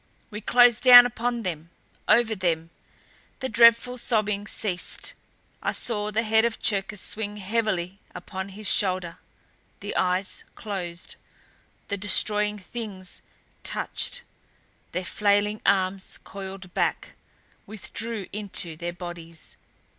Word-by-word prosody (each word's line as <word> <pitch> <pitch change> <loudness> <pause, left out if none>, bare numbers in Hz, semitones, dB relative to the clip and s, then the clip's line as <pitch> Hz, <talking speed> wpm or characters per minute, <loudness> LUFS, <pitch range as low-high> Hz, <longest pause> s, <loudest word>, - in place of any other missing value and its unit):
We 210 +1 -6
closed 245 +1 +5
down 245 -1 +11
upon 240 0 -2
them 170 -3 -4 0.4
over 230 -1 +4
them! 165 -4 -1 0.7
The 260 - -2
dreadful 235 +2 +5
sobbing 210 -3 +1
ceased. 185 -5 -1 0.5
I - - -1
saw 210 -3 -2
the 220 +2 0
head 220 0 +3
of 235 -1 -1
Cherkis 200 0 0
swing 210 +2 -3
heavily 195 -3 -2 0.2
upon 190 +2 -6
a 205 +2 -10
shoulder; 185 -5 +2 0.6
the - - -6
eyes 185 +2 0
closed. 180 -5 -6 0.7
The 200 - -2
Destroying 210 +2 +2
Things 200 -2 -7 0.4
touched. - - -2 0.7
Their 180 0 -3
flailing 205 +2 +1
arms 190 -1 +1
coiled 190 -2 -9
back, - - -1 0.5
withdrew 220 0 -4
into 195 -5 -5
their 175 +2 -5
bodies. 170 -2 -9
205 Hz, 115 wpm, -25 LUFS, 185-220 Hz, 0.7 s, down